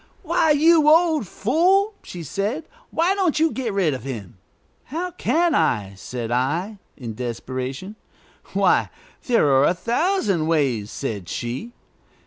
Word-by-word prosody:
"Why, 320 - +2
you 305 +1 +5
old 320 - +4
fool!" 365 - +2
she 175 -2 -8
said; 210 - -3 0.2
"why 340 +4 +2
don't 365 -6 +1
you 320 0 +3
get 255 -4 -3
rid 190 -7 +1
of 130 - -5
him?" 110 -9 -7 0.5
"How 345 +6 -4
can 345 -1 +1
I?" 105 - +1
said 115 +4 -6
I, 165 - -1 0.2
in 120 -5 -6
desperation. 130 - -5 0.6
"Why, - - +3 0.4
there 235 - +3
are 135 +1 +5
a 180 - +2
thousand 230 - 0
ways," 135 -10 +1
said 105 -10 -5
she. 130 - -5
195 Hz, 135 wpm, -22 LUFS, -, 0.6 s, you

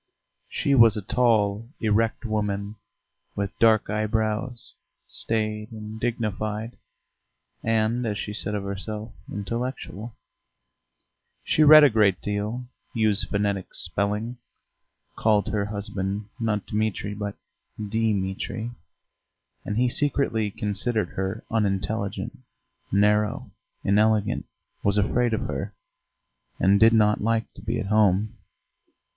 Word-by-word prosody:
She 140 - 0
was 115 -5 +6
a 105 - -4
tall, 110 -1 +1
erect 115 +2 +1
woman 105 -1 -2 0.6
with 100 -1 -3
dark 110 -2 +5
eyebrows, 110 +3 -1 0.3
staid 110 0 -1
and 110 0 -8
dignified, 110 -1 -2 0.9
and, 115 +2 +1
as 105 -1 -2
she 105 - -4
said 105 0 +1
of 100 - -3
herself, 105 +2 -4 0.2
intellectual. 115 0 -5 1.3
She - - +1
read 155 0 +10
a 145 - +8
great 105 -4 +3
deal, 105 +4 -3 0.3
used 110 -2 +2
phonetic 100 -2 -1
spelling, 105 +5 -1 0.8
called 105 -2 +2
her 105 -2 0
husband, 100 -1 -3
not 105 -3 -1
Dmitri, 105 -1 -2
but 105 -1 -4 0.4
Dimitri, 105 +1 -2 0.9
and 105 - -3
he 125 +1 +3
secretly 120 -5 0
considered 105 +3 0
her 95 +3 -4
unintelligent, 100 -1 -1 0.5
narrow, 105 +1 +2 0.3
inelegant, 105 +1 +2 0.4
was 100 0 +2
afraid 115 +3 +2
of - - -3
her, - - -4 0.8
and 100 +2 +4
did 115 +1 +7
not 105 -1 +3
like 115 +1 0
to - - -12
be 110 +3 -2
at 110 - -3
home. 105 0 +2
105 Hz, 110 wpm, -25 LUFS, 100-115 Hz, 1.3 s, read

